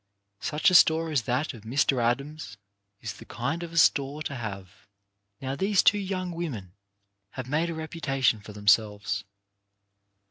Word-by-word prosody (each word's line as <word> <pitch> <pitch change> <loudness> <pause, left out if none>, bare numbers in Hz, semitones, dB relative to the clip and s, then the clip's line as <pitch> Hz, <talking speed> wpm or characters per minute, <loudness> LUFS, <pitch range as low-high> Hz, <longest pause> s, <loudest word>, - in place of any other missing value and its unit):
Such 150 - +2
a - - -1
store 160 -2 +5
as 145 -5 +2
that 130 +6 0
of 115 - -11
Mr. 125 +3 +1
Adams 130 -2 -2 0.4
is - - -5
the - - -13
kind 140 +8 -3
of 170 -1 -6
a 165 - -6
store 145 -1 +3
to 140 - -4
have. 100 -5 -8 0.5
Now, 135 0 -3
these 195 +6 +2
two 205 - +5
young 185 -2 -3
women 130 - -5 0.6
have 130 -1 -6
made 155 +5 0
a - - -3
repu 160 +1 -7
tation 135 -7 +1
for 105 - -10
themselves. 105 0 +1
140 Hz, 165 wpm, -27 LUFS, 110-160 Hz, 0.6 s, store